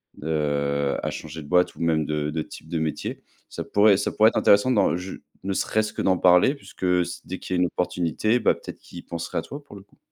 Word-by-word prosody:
de 70 -2 -1
à - - -1
changer 80 +1 -7
de 70 - -12
boîte 90 +2 +2
ou - - -10
même 80 -2 +1
de 75 0 -2
de 80 +1 -2
type 75 - -10
de 80 0 -2
métier. 80 -1 -3 0.3
Ça - - -5
pourrait 105 0 +4
ça 100 - -1
pourrait 110 +1 +5
être - - -4
intéressant 100 +5 +4
dans 105 -7 +3
j 90 +1 -7 0.2
ne 95 - -2
serait-ce 110 +2 0
que - - -3
d'en 95 -1 +2
parler 90 +9 +5
puisque 140 - -13
s 90 -1 +1
dès 95 - -6
qu'il 95 - -4
y 90 - +1
a - - +2
une 90 - +3
opportunité, 90 +6 0
bah, - - +4
peut-être - - -10
qu'ils - - -12
penserait 85 0 -5
à - - -2
toi, 145 +1 -9
pour 140 - -14
le 95 - -13
coup. 100 - -29
90 Hz, 250 wpm, -24 LUFS, 80-100 Hz, 0.3 s, pourrait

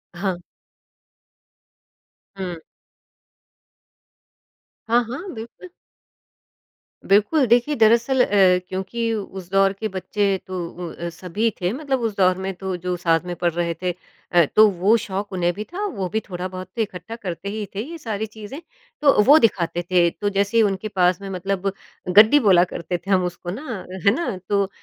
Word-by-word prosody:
हाँ। 185 -1 -2 2.0
हुँ। 180 -3 -5 2.3
हाँ, 240 +1 +4
हाँ। 335 +11 -6
बिल्कुल। 230 +11 -10 1.4
बिल्कुल 215 +9 +4
देखिए 245 +6 +3
दरअसल 235 +4 +4
अ, - - 0 0.4
क्योंकि 225 +5 -2
उस 190 -4 -6
दौर 195 0 +3
के 220 +2 -4
बच्चे 195 +1 -1
तो 185 0 -5
उ 175 -1 -7
अ, 170 0 -5
सभी 185 +6 -2
थे, 180 - +1
मतलब 270 -2 -2
उस 225 -3 -2
दौर 185 -1 +3
में 190 0 -3
तो 190 0 -4
जो 180 +1 -3
साथ 165 -2 +2
में 175 -1 -4
पढ़ 175 0 0
रहे 170 0 -1
थे। 180 - 0 0.4
अ, 175 -2 +5
तो 215 0 +8
वो 195 +4 +3
शौक 200 +1 -4
उन्हें 175 -1 +1
भी 210 - -5
था 375 - -5
वो 200 - -3
भी 220 - 0
थोड़ा 180 0 -4
बहुत 185 0 -8
तो 230 - 0
इकट्ठा 210 +2 -5
करते 200 -3 -6
ही 215 0 -4
थे 205 - -2
ये 335 - -7
सारी 220 -7 -3
चीज़ें, 220 +5 -9 0.4
तो 280 -7 +5
वो 290 +7 +7
दिखाते 175 - +1
थे। 175 -2 +4
तो 205 +4 -3
जैसे 200 +3 0
ही 225 - +6
उनके 200 0 -1
पास 180 -2 +1
में 195 - -6
मतलब 195 +1 -2 0.5
गड्डी 220 +7 +8
बोला 190 -8 +5
करते 170 +1 -3
थे 195 +3 -7
हम 185 -1 +4
उसको 175 0 -6
ना, 225 -3 -6 0.2
है 200 - +8
ना? 255 - -2
तो 200 -1 +1
195 Hz, 170 wpm, -22 LUFS, 180-225 Hz, 2.3 s, तो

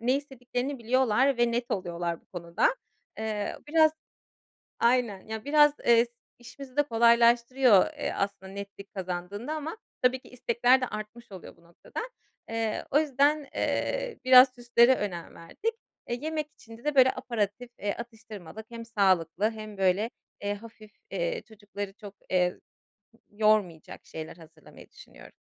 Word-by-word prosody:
ne 245 +3 +2
istediklerini 265 -1 -4
biliyorlar 255 +2 +2
ve 240 0 +3
net 240 +1 -2
oluyorlar 170 -2 -2
bu - - -36
konuda. 175 - 0 0.4
Eee, 215 -2 -3
biraz 315 0 +5 0.9
Aynen. 235 -5 +2
Ya, 220 0 -6
biraz, 295 0 +5
eee, 235 0 +5 0.3
işimizi 255 +2 -12
de 290 - +5
kolaylaştırıyor, 235 -1 +5
eee, 295 - -3
aslında 195 -1 -3
netlik 200 0 -9
kazandığında 190 - -4
ama 315 +5 -5 0.2
tabii 255 +1 +3
ki - - -18
istekler 245 +1 +2
de 255 - 0
artmış 215 +2 -8
oluyor 190 -2 -10
bu 170 - -24
noktada. 170 0 -9 0.5
Eee, 225 -1 -2
o 290 - +5
yüzden, 290 0 +2
eee, - - -1
biraz 255 0 +8
süslere 240 +1 +4
önem 180 -7 -5
verdik. 430 - -4 0.4
Eee, 240 0 -2
yemek 310 -1 -2
içinde 225 0 -14
de 300 -1 -1
böyle 260 -1 +7
aperitif, 230 0 -3
eee, 205 0 -1
atıştırmalık 220 -4 -9
hem 230 -1 -7
sağlıklı 195 -2 +2
hem 215 -2 -9
böyle, 195 +4 +2 0.3
eee, 205 0 0
hafif, 215 0 -12 0.2
eee, - - -2
çocukları 205 -2 -7
çok, 205 -1 -12
eee, 180 -1 +1 0.7
yormayacak 210 -6 0
şeyler 160 +1 -8
hazırlamayı 160 -1 -16
düşünüyorum. - - -15
230 Hz, 140 wpm, -28 LUFS, 200-255 Hz, 0.9 s, biraz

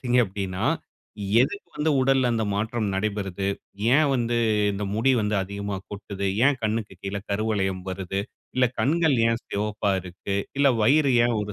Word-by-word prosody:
பார்த்தீங்க 125 -1 +2
அப்படினா, 95 -2 -4 0.8
எதுக்கு 200 +11 -1
வந்து 155 +1 +1
உடல்ல 130 -1 +3
அந்த 115 -1 0
மாற்றம் 110 +2 -1
நடைபெறுது? 100 -1 -2 0.5
ஏன் 155 +1 +4
வந்து, 120 -1 0 0.4
இந்த 100 +1 -3
முடி 115 +5 +3
வந்து 105 0 0
அதிகமா 100 +1 -4
கொட்டுது? 100 -1 -5 0.2
ஏன், 145 0 +4
கண்ணுக்கு 110 -1 -1
கீழே 100 +1 -3
கருவளையம் 100 -3 0
வருது? 95 +1 -3 0.3
இல்ல, 130 -1 +4
கண்கள் 160 0 +3
ஏன் 115 0 0
சிவப்பா 105 0 -1
இருக்கு? 95 +2 -5 0.2
இல்ல, 140 0 +5
வயிறு 140 +4 +4 0.2
ஏன் 120 - 0
ஒரு 105 0 -4
105 Hz, 150 wpm, -25 LUFS, 100-125 Hz, 0.8 s, இல்ல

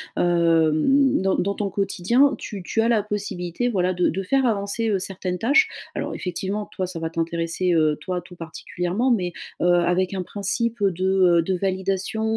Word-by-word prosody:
hem, 170 - +3
dans 190 0 +2
dans 200 +2 -1
ton 200 -1 -3
quotidien, 205 +9 +2
tu 205 -4 -7
tu 225 +5 -1
as 230 - +2
la 230 -3 +3
possibilité, 205 0 -3
voilà 185 -4 +1
de 180 0 +1
de 190 - -2
faire 265 +7 +1
avancer, 220 0 0
heu, 200 -3 +1
certaines 185 -1 -4
tâches. 280 - +4 0.3
Alors - - -3
effectivement, 195 +3 -3
toi 185 - -3
ça 180 -2 -6
va 165 0 -3
t'intéresser, 165 +2 -1
heu, 155 -2 +2
toi 180 +3 -3
tout 180 +1 -14
particulièrement, 175 +7 -3
mais, 180 -8 +1 0.3
heu, - - +2
avec 175 +1 +2
un 190 - -2
principe 210 +4 -2
de, 185 -2 0 0.4
heu, - - +4
de 185 +3 -1
validation 190 +3 -1
190 Hz, 180 wpm, -23 LUFS, 175-210 Hz, 0.4 s, tâches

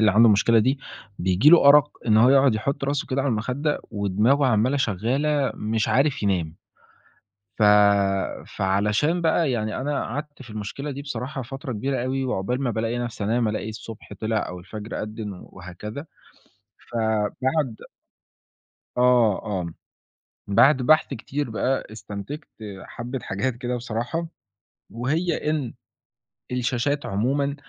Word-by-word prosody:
اللي - - +6
عنده 115 +1 +8
مشكلة 110 +2 +4
دي، 130 +5 +2 0.4
بييجي 95 +10 +4
له 165 -4 +7
أرَق 145 0 +7 0.2
إن 110 -2 +4
هو 115 +3 +6
يقعد 135 -2 +5
يحُط 135 +6 -2
راسه 145 +3 -1
كده 135 -1 -1
على 140 - 0
المخدة، 130 +6 -1
ودماغه 105 +7 +2
عمَّالة 125 +3 +2
شغّالة 135 +5 0
مش 110 +1 -1
عارف 135 -1 +2
ينام. 85 -5 -1 1.0
ف - - 0 0.9
فعلشان 105 - +1
بقى 160 -2 +2
يعني 110 -2 -2
أنا 145 +2 -1
قعدت 145 +3 -6
في 120 - -13
المشكلة 110 +7 -5
دي 140 0 -6
بصراحة 135 0 -5
فترة 135 +3 -6
كبيرة 125 +3 -2
أوي، 135 +1 -1
وعقبال 125 +1 -1
ما 130 - 0
بالاقي 115 +1 -2
نفسي 120 -3 -4
أنام، 115 +2 +1
ألاقي 105 0 -3
الصبح 110 0 -9
طلِع 110 -1 -1
أو 90 - -7
الفجر 105 +5 -6
أدِّن 105 -1 -5 0.2
وهكذا. 105 - -8 0.9
فبعد 115 +4 0 1.2
آه، 125 -4 +4
آه. 95 -5 -2 0.8
بعد 125 +6 +4
بحث 155 +5 +5
كتير 140 +3 -4
بقى، 130 +4 -1
استنتجت 105 - -7 0.4
حبِّة 125 +2 -6
حاجات 115 +6 -2
كده 125 +1 -3
بصراحة، 120 +8 -3 0.6
وهي 155 +7 -1
إن 145 -7 -2 0.8
الشاشات 125 +3 -1
عمومًا 140 +8 0
120 Hz, 135 wpm, -24 LUFS, 110-140 Hz, 1.2 s, عنده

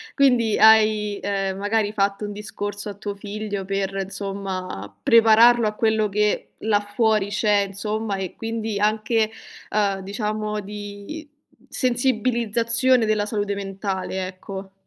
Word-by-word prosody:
quindi 245 -6 +3
hai, 215 -2 +5
ehm, 195 -1 -2
magari 205 +1 0
fatto 200 0 0
un 205 - -4
discorso 205 0 -5
a 205 - -4
tuo 205 0 -6
figlio 205 -1 -5
per, 195 0 -2
insomma, 190 - -5
prepararlo 230 -1 +6
a 210 - -2
quello 220 -1 +1
che 210 +1 0
là 210 -1 +2
fuori 215 -1 +1
c'è 205 -1 +2
insomma, 210 +1 -3
e 190 -2 -4
quindi 225 -2 -3
anche, 215 +1 +1 0.4
uhm, 200 -2 +1
diciamo 210 +1 -3
di 205 +9 -8 0.4
sensibilizzazione 240 -1 +1
della 215 -1 +1
salute 205 -1 -2
mentale 195 -1 -3
ecco. 190 +1 -8
210 Hz, 125 wpm, -23 LUFS, 200-220 Hz, 0.4 s, prepararlo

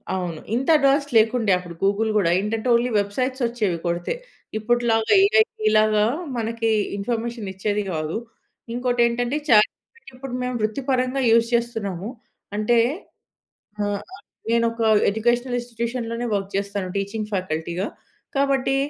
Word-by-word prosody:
అవును. 175 -4 -3 0.2
ఇంత 260 +3 -1
అడ్వాన్స్ 280 0 +3
లేకుండే. 225 -1 +3
అప్పుడు 175 -1 -9
గూగుల్ 205 +3 +2
గూడా 190 -5 +3
ఏంటంటే 220 +4 -2
ఓన్లీ 240 +1 +2
వెబ్‌సైట్స్ 255 +6 -2
వచ్చేవి 220 -7 -1
కొడితే. 170 0 -1 0.4
ఇప్పుటిలాగా 225 0 +2
ఏఐ 440 +2 +5 0.3
లాగా 215 -1 +4 0.3
మనకి 230 0 -1 0.3
ఇన్ఫర్మేషన్ 230 0 -3
ఇచ్చేది 205 +2 -1
గాదు. 155 +2 -2 0.6
ఇంకోటి 245 0 0
ఏంటంటే, 245 +4 -1
చాట్‌జిపిటి 225 - +2
ఇప్పుడు 255 0 -8
మేము 250 0 -2
వృత్తి 215 +5 -1
పరంగా 255 +1 +1
యూజ్ 230 0 +4
చేస్తున్నాము. 220 -5 -2 0.5
అంటే 230 +3 +3 1.1
ఆహ్, 205 -1 -1
ఆహ్, - - -14 0.3
నేను 230 0 +3
ఒక 230 0 -4 0.3
ఎడ్యుకేషనల్ 240 +4 0
ఇన్స్‌స్టిట్యూషన్‌లోనే 235 0 -3
వర్క్ 195 -1 -3
జేస్తాను. 200 -1 -2
టీచింగ్ 210 +2 -4
ఫ్యాకల్టీ‌గా. 175 0 -2 0.5
కాబట్టి 275 -1 +2
225 Hz, 125 wpm, -23 LUFS, 200-245 Hz, 1.1 s, ఏఐ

